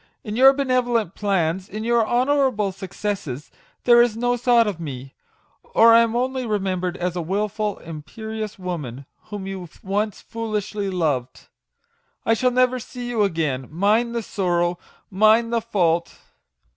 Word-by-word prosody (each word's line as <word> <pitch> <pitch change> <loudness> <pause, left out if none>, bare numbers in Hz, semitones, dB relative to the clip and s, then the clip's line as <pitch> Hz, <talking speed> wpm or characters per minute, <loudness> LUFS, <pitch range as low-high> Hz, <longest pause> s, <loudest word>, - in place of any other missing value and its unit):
In 210 -2 -5
your 265 +3 +8
benevolent 250 - 0
plans, 190 -2 -1
in 215 +1 -5
your 235 0 +3
honourable 250 -5 +2
successes, 185 -7 -5 0.3
there 240 -1 +7
is 235 -2 +2
no 245 +1 +1
thought 240 -1 +4
of 200 -5 -3
me; 135 -4 -7 0.5
or 230 - +5
I 230 - +8
am 230 0 +2
only 255 +1 -1
remembered 190 -5 -1
as 180 0 -2
a 175 - -1
wilful, 205 +4 -2
imperious 215 +7 -7
woman, 150 -9 -5 0.2
whom 205 -2 -6
you 190 -3 -6
once 205 +1 -1
foolishly 210 -3 -3
loved. 145 -9 -2 0.8
I 225 - +4
shall 250 +3 +2
never 255 0 +2
see 245 +1 -7
you 235 -3 0
again 155 -9 0
mine 210 +8 +1
the 235 -1 -2
sorrow, 175 -3 0 0.3
mine 215 +4 +4
the 230 -1 +1
fault 175 -7 0
210 Hz, 145 wpm, -22 LUFS, 180-235 Hz, 0.8 s, your